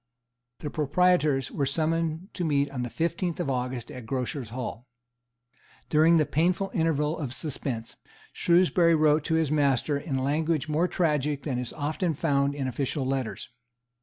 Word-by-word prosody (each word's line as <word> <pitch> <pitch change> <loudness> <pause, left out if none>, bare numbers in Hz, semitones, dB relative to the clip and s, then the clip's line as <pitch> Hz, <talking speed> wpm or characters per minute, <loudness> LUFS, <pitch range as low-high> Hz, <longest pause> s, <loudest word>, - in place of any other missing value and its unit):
The 150 - -4
proprietors 150 -3 +2
were 140 - -1
summoned 165 +4 -1
to 180 - -3
meet 145 -3 +1
on 130 -3 -4
the 120 - -3
fifteenth 170 +4 -2
of 145 -6 -1
August 125 -1 -3
at 125 -3 -9
Grocers' 130 -1 -3
Hall. 120 0 -6 1.0
During 160 +2 +5
the 155 - +3
painful 180 +6 +1
interval 160 -2 +1
of 135 -4 -3
suspense, 130 -5 -4 0.4
Shrewsbury 170 -1 +4
wrote 155 -1 +3
to 160 - +1
his 160 -3 +1
master 140 -1 +2
in 140 -2 -3
language 155 +3 0
more 155 +4 +1
tragic 150 -5 0
than 130 -5 -2
is 125 -1 -4
often 155 +3 -1
found 140 -2 +1
in 135 -2 -2
official 135 +2 -2
letters. 130 -3 -3
150 Hz, 155 wpm, -27 LUFS, 135-165 Hz, 1.0 s, During